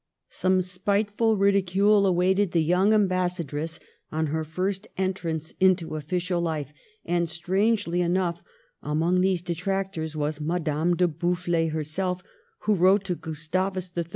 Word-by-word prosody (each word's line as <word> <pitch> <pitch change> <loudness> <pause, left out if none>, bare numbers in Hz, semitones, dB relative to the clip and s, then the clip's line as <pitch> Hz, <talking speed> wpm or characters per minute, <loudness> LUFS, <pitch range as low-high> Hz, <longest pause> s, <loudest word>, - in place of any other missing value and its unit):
Some 185 +2 +1
spiteful 205 +4 0
ridicule 200 +1 +3
awaited 185 +1 +2
the 165 -2 +3
young 180 +6 +3
am 210 -2 +4
bassadress 170 -4 -2 0.3
on 160 +1 0
her 160 0 0
first 185 +6 -3
entrance 170 -4 -2
into 185 -4 +2
official 175 +3 -2
life, 155 -4 -3 0.3
and, 170 -1 0
strangely 185 +1 0
enough, 175 -1 0 0.4
among 165 +4 +1
these 185 -2 +1
detractors 180 -2 -3
was 150 0 -2
Madame 165 +1 0
de 180 +1 +3
Boufflers 170 0 0
herself, 180 +4 -2 0.4
who 215 - +2
wrote 190 +2 +4
to 190 -2 -2
Gustavus 180 +4 -3
III. 170 -1 -1
180 Hz, 130 wpm, -26 LUFS, 165-190 Hz, 0.4 s, am